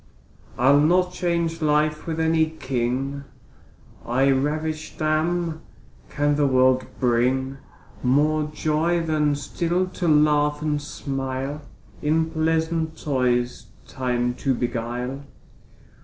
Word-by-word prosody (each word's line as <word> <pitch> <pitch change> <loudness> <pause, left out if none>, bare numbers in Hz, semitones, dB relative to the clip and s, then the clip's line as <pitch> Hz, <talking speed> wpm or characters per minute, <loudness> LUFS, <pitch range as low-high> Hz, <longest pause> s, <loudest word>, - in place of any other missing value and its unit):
I'll 135 +3 +5
not 180 +4 +3
change 170 -2 -1
life 150 +1 +1
with 160 -1 -2
any 160 0 +3
king, 135 -1 -2 0.8
I 135 +3 +2
ravisht 155 +3 -2
am: 160 +1 0 0.5
can 145 0 +1
the 145 -1 +3
world 130 -1 +3
bring 130 +2 +1 0.4
More 150 +4 +2
joy, 160 +3 0
than 150 -2 +1
still 170 +5 -1
to 185 -1 -4
laugh 150 -1 +3
and 150 -1 0
smile, 135 +1 -4 0.4
In 160 +2 +1
pleasant 160 0 0
toys 125 -3 0 0.2
time 125 -2 -1
to 135 -2 +1
beguile? 120 +2 -3
150 Hz, 105 wpm, -23 LUFS, 130-160 Hz, 0.8 s, I'll